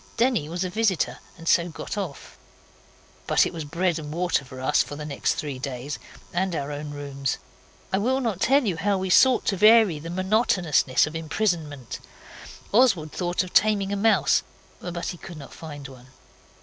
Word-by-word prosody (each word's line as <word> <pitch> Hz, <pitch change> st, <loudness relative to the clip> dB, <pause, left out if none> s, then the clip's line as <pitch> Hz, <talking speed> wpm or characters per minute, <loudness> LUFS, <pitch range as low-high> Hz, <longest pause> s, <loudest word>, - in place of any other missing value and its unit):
Denny 230 Hz, -, +2 dB
was 175 Hz, +3 st, -2 dB
a 185 Hz, -, -2 dB
visitor 210 Hz, -3 st, 0 dB, 0.2 s
and 165 Hz, 0 st, -11 dB
so 170 Hz, 0 st, +3 dB
got 160 Hz, -, -6 dB
off. 190 Hz, -9 st, -6 dB, 0.9 s
But -, -, +4 dB
it -, -, -4 dB
was 160 Hz, -, -5 dB
bread 170 Hz, +2 st, 0 dB
and 150 Hz, -1 st, -7 dB
water 175 Hz, -2 st, 0 dB
for 130 Hz, -1 st, -11 dB
us 130 Hz, +3 st, +3 dB
for 145 Hz, -, -5 dB
the 150 Hz, +1 st, -6 dB
next 145 Hz, -2 st, -1 dB
three 145 Hz, -4 st, -4 dB
days, 135 Hz, +1 st, -5 dB, 0.3 s
and 185 Hz, 0 st, 0 dB
our 145 Hz, -1 st, -3 dB
own 145 Hz, +1 st, -5 dB
rooms. 140 Hz, -2 st, -3 dB, 0.6 s
I 190 Hz, -, +3 dB
will 255 Hz, +5 st, +1 dB
not 225 Hz, -8 st, -2 dB
tell 275 Hz, +1 st, +4 dB
you 185 Hz, -6 st, -1 dB
how 200 Hz, +4 st, +1 dB
we 190 Hz, 0 st, -2 dB
sought 260 Hz, +5 st, +5 dB
to 195 Hz, -, +1 dB
vary 215 Hz, -5 st, +6 dB
the 165 Hz, +3 st, -7 dB
monotonousness 185 Hz, -, +2 dB
of 155 Hz, +1 st, -7 dB
imprisonment. 160 Hz, -, -2 dB, 0.7 s
Oswald 200 Hz, -, +3 dB
thought 175 Hz, 0 st, -1 dB
of 185 Hz, -, -10 dB
taming 205 Hz, -2 st, +3 dB
a -, -, 0 dB
mouse, 200 Hz, -6 st, +3 dB, 0.4 s
but 175 Hz, -1 st, -5 dB
he 175 Hz, -, -6 dB
could 175 Hz, -, -9 dB
not 140 Hz, -, -11 dB
find 145 Hz, -4 st, -8 dB
one. 130 Hz, -1 st, -14 dB
175 Hz, 185 wpm, -25 LUFS, 150-200 Hz, 0.9 s, vary